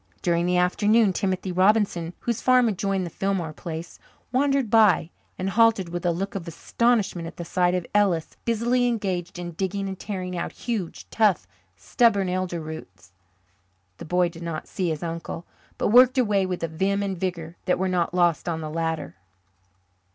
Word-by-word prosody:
During 170 Hz, 0 st, +1 dB
the 180 Hz, 0 st, +2 dB
afternoon 205 Hz, +3 st, +3 dB
Timothy 185 Hz, 0 st, -1 dB
Robinson, 185 Hz, -3 st, +2 dB
whose 235 Hz, -1 st, -2 dB
farm 255 Hz, -1 st, +4 dB
adjoined 195 Hz, -2 st, -1 dB
the 170 Hz, -, -7 dB
Fillmore 190 Hz, -5 st, -2 dB
place, 165 Hz, +1 st, -7 dB, 0.3 s
wandered 275 Hz, -3 st, +1 dB
by 210 Hz, -7 st, +4 dB, 0.3 s
and 190 Hz, +1 st, -2 dB
halted 225 Hz, -4 st, +3 dB
with 175 Hz, +1 st, -3 dB
a -, -, +3 dB
look 195 Hz, +4 st, -3 dB
of 185 Hz, -3 st, -5 dB
astonishment 195 Hz, 0 st, 0 dB
at -, -, -10 dB
the 170 Hz, -, -5 dB
sight 180 Hz, +1 st, +1 dB
of 180 Hz, -2 st, -2 dB
Ellis, 195 Hz, -6 st, +1 dB
busily 240 Hz, +2 st, +1 dB
engaged 185 Hz, -7 st, -2 dB
in 175 Hz, -1 st, -5 dB
digging 195 Hz, +3 st, -3 dB
and 190 Hz, -1 st, -6 dB
tearing 185 Hz, -3 st, -4 dB
out 170 Hz, -, -4 dB
huge, 220 Hz, -8 st, -4 dB
tough, 210 Hz, -6 st, +2 dB, 0.3 s
stubborn 200 Hz, -, +2 dB
elder 180 Hz, -1 st, -2 dB
roots. 155 Hz, -, -9 dB, 0.9 s
The -, -, -7 dB
boy 180 Hz, +2 st, +2 dB
did 170 Hz, 0 st, -12 dB
not 165 Hz, -2 st, -5 dB
see 185 Hz, -3 st, -2 dB
his 155 Hz, 0 st, -3 dB
uncle, 165 Hz, 0 st, -5 dB, 0.3 s
but -, -, 0 dB
worked 250 Hz, +3 st, +6 dB
away 205 Hz, -6 st, +2 dB
with 180 Hz, -2 st, -4 dB
a -, -, +1 dB
vim 195 Hz, +5 st, 0 dB
and 195 Hz, -1 st, -2 dB
vigour 170 Hz, -2 st, -4 dB
that 180 Hz, -, +2 dB
were 190 Hz, -, 0 dB
not 180 Hz, -2 st, 0 dB
lost 175 Hz, -1 st, +1 dB
on 165 Hz, -1 st, -2 dB
the 155 Hz, -1 st, -5 dB
latter. 160 Hz, -7 st, -3 dB
185 Hz, 175 wpm, -25 LUFS, 170-205 Hz, 0.9 s, worked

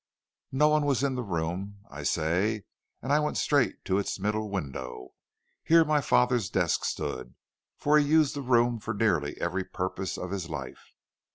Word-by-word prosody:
"No 150 Hz, +3 st, +4 dB
one 150 Hz, -1 st, +2 dB
was 135 Hz, -2 st, +1 dB
in 140 Hz, -1 st, +1 dB
the 125 Hz, -, -2 dB
room, 95 Hz, +1 st, -4 dB
I 75 Hz, +2 st, -7 dB
say, 90 Hz, +8 st, 0 dB, 0.4 s
and 135 Hz, +3 st, 0 dB
I 150 Hz, -, +5 dB
went 150 Hz, 0 st, -1 dB
straight 130 Hz, -9 st, +1 dB
to 95 Hz, +1 st, +1 dB
its 100 Hz, -, -2 dB
middle 105 Hz, +2 st, -1 dB
window. 65 Hz, -9 st, -5 dB, 0.5 s
Here 165 Hz, 0 st, +5 dB
my 150 Hz, -1 st, +2 dB
father's 125 Hz, -7 st, +2 dB
desk -, -, +1 dB
stood, 65 Hz, -1 st, -4 dB, 0.4 s
for 150 Hz, +1 st, +4 dB
he 145 Hz, -, +2 dB
used 155 Hz, -1 st, +4 dB
the 140 Hz, -, -3 dB
room 120 Hz, -2 st, +2 dB
for 110 Hz, +1 st, -4 dB
nearly 85 Hz, -9 st, 0 dB
every 95 Hz, +2 st, -1 dB
purpose 95 Hz, +1 st, -4 dB
of 90 Hz, -, -5 dB
his 95 Hz, -4 st, -4 dB
life. 65 Hz, -5 st, -8 dB
105 Hz, 175 wpm, -28 LUFS, 85-135 Hz, 0.5 s, I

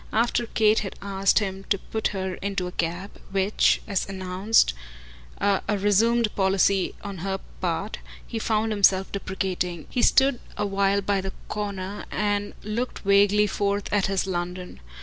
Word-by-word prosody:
After 235 Hz, +1 st, +1 dB
Kate 215 Hz, -1 st, +3 dB
had 195 Hz, -, -5 dB
asked 195 Hz, -1 st, +2 dB
him 195 Hz, -2 st, -1 dB
to 200 Hz, -, +1 dB
put 220 Hz, +3 st, -2 dB
her 190 Hz, -2 st, -3 dB
into 195 Hz, -2 st, -2 dB
a 180 Hz, -, -5 dB
cab 175 Hz, +4 st, -3 dB, 0.2 s
which, 195 Hz, +1 st, +2 dB
as 200 Hz, -2 st, -1 dB
an 195 Hz, -, -5 dB
announced, 185 Hz, -, +2 dB, 0.7 s
a 200 Hz, +1 st, +1 dB
resumed 215 Hz, +3 st, +3 dB
policy 190 Hz, 0 st, +2 dB
on 200 Hz, -3 st, -6 dB
her 195 Hz, +2 st, -2 dB, 0.2 s
part, 180 Hz, +3 st, -2 dB, 0.3 s
he 225 Hz, -, -4 dB
found 220 Hz, 0 st, 0 dB
himself 195 Hz, -2 st, +3 dB
deprecating 185 Hz, -4 st, -3 dB
he 245 Hz, -, 0 dB
stood 265 Hz, -1 st, +4 dB, 0.2 s
a 205 Hz, -, 0 dB
while 200 Hz, 0 st, +1 dB
by 200 Hz, 0 st, 0 dB
a 190 Hz, 0 st, -3 dB, 0.2 s
corner 200 Hz, -1 st, -4 dB
and 205 Hz, -1 st, -1 dB
looked 230 Hz, +4 st, -3 dB
vaguely 200 Hz, +1 st, +5 dB
forth 200 Hz, 0 st, -1 dB
at 205 Hz, -2 st, +2 dB
his 195 Hz, -1 st, 0 dB
London. 180 Hz, -, -4 dB
200 Hz, 155 wpm, -25 LUFS, 190-210 Hz, 0.7 s, vaguely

